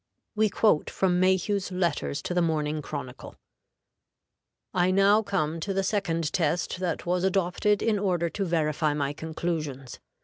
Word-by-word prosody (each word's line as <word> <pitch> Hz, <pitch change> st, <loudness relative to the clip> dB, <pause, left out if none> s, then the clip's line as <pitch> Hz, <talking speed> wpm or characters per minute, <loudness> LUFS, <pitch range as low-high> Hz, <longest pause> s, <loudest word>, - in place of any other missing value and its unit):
We 215 Hz, 0 st, +2 dB
quote 205 Hz, -7 st, +2 dB
from 180 Hz, -2 st, +1 dB
Mayhew's 190 Hz, +1 st, +1 dB
letters 170 Hz, -5 st, -1 dB
to -, -, -3 dB
the 175 Hz, -, +2 dB
Morning 155 Hz, -2 st, 0 dB
Chronicle: 140 Hz, -4 st, -7 dB, 1.4 s
"I 180 Hz, 0 st, +2 dB
now 195 Hz, +3 st, +4 dB
come 165 Hz, -6 st, -1 dB
to 195 Hz, +4 st, -3 dB
the 195 Hz, -, +1 dB
second 165 Hz, -6 st, -1 dB
test 170 Hz, +2 st, 0 dB
that 180 Hz, -3 st, -2 dB
was 180 Hz, +1 st, 0 dB
adopted 190 Hz, +2 st, +1 dB
in 215 Hz, -3 st, +1 dB
order 180 Hz, -4 st, 0 dB
to 195 Hz, +4 st, -3 dB
verify 155 Hz, -3 st, 0 dB
my 145 Hz, -1 st, -1 dB
conclusions. 155 Hz, -5 st, -4 dB
175 Hz, 145 wpm, -27 LUFS, 155-195 Hz, 1.4 s, now